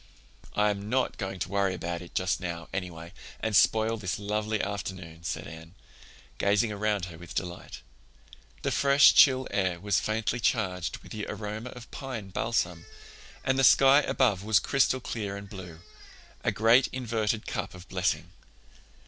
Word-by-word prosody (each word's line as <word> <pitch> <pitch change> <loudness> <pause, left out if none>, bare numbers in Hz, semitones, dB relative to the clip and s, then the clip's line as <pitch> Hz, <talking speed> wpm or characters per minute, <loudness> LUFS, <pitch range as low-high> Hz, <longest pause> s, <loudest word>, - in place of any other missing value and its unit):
"I'm 105 -1 +1
not 130 +2 0
going 95 -2 -4
to - - -2
worry 100 -2 +1
about 85 0 -4
it 90 - -12
just 95 -1 0
now, 85 -3 -5
anyway, 85 -2 -5 0.3
and 110 -1 -1
spoil 110 +3 +4
this 105 0 -3
lovely 105 +1 -2
afternoon," 95 -5 -5
said 80 -4 -3
Anne, 80 +3 -11 0.6
gazing 105 +2 +2
around 105 -2 -1
her 85 -2 -10
with 85 -2 -10
delight. 90 -1 -5 0.8
The - - 0
fresh 140 0 +6
chill 130 -2 +6
air 95 -3 0
was 100 0 +1
faintly 110 +4 -1
charged 95 -7 0
with - - -14
the 105 -1 -5
aroma 105 +3 -5
of 125 -1 -11
pine 120 -8 -6
balsam, 90 -5 -1 0.6
and 130 0 +1
the - - +3
sky 135 +2 +7
above 115 -9 +1
was 110 0 +4
crystal 130 +7 +2
clear 105 -5 -4
and 100 0 -9
blue—a 90 -4 -8
great 115 +4 +4
inverted 115 -3 -2
cup - - -4
of 90 0 -12
blessing. 90 -1 -1
100 Hz, 155 wpm, -28 LUFS, 90-115 Hz, 0.8 s, sky